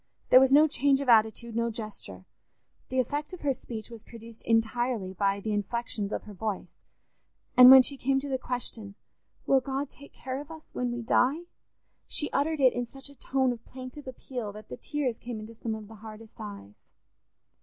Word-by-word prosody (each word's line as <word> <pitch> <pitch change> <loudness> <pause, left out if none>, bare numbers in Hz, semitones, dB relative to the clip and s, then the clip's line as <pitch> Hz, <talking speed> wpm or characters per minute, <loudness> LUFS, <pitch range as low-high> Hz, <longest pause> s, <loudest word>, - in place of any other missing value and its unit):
There 255 - +10
was 265 0 +4
no 300 +3 +7
change 280 -2 +2
of 280 -2 -2
attitude, 225 0 +3
no 235 0 +1
gesture; 215 - -8 0.6
the 260 - -3
effect 290 +6 -2
of 365 - -8
her 280 -2 +1
speech 235 -3 -8
was 230 -2 -10
produced 230 0 -13
entirely 225 -3 0
by 200 +1 0
the 215 +1 -3
inflections 210 0 -2
of - - -3
her 210 - -10
voice, 205 +1 -5 0.8
and 250 0 +10
when 265 0 +11
she 280 +2 -2
came 270 +1 +1
to 285 - -6
the 265 -2 -1
question, 230 -5 -4 0.5
"Will 270 - +4
God 270 +2 -4
take 285 - -15
care 260 +2 -5
of 295 - -12
us 320 -1 -10
when 250 -1 -1
we 240 0 -4
die?" 265 +8 +2 0.6
she 295 - -1
uttered 310 +2 0
it 260 -2 +5
in 245 0 -3
such 270 +3 -11
a - - -17
tone 265 -1 0
of 230 -1 -12
plaintive 260 +2 -10
appeal 250 -3 -6
that 215 +1 -12
the 125 - -5
tears 270 -6 -2
came 240 -2 -6
into 215 +2 -9
some 225 0 -4
of 215 -1 -9
the 225 - -12
hardest 220 +1 -12
eyes. 200 - -8
240 Hz, 195 wpm, -28 LUFS, 220-270 Hz, 0.8 s, when